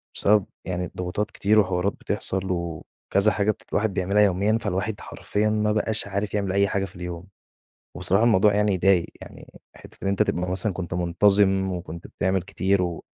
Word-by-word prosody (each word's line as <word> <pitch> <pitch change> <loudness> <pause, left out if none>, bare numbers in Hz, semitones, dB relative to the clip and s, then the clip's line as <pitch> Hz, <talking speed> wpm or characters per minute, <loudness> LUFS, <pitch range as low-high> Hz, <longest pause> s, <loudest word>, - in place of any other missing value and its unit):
بسبب 105 -1 +3 0.2
يعني 90 -1 -2
الضغوطات 90 +4 -4
كتير 105 +2 +2
وحوارات 95 0 +1
بتحصل 95 - -2
وكذا 85 +4 -1
حاجة 105 +1 +1
بت - - -12
الواحد 105 -1 0
بيعملها 95 +3 +1
يوميًا، 100 +3 +2
فالواحد 100 +4 -2
حرفيًا 105 +1 -2
ما 105 0 +1
بقاش 110 0 -1
عارف 100 0 -3
يعمل 100 -2 -1
أي 100 +1 +3
حاجة 95 0 -1
في 95 - -13
اليوم. 90 +1 -7 0.7
وبصراحة 100 +4 +2
الموضوع 105 -3 +4
يعني 105 -1 +2
يضايق، 90 -1 +3 0.2
يعني - - -13 0.2
حِتّة 95 - -7
أنت 100 - +2
تبقى 90 +1 -2
مثلًا 95 +2 0
كنت 90 -2 -5
منتظم 95 +2 +2
وكنت 85 -2 -7
بتعمل 95 -1 -1
كتير 95 +1 0
و 85 -2 -3
95 Hz, 170 wpm, -24 LUFS, 90-105 Hz, 0.7 s, الموضوع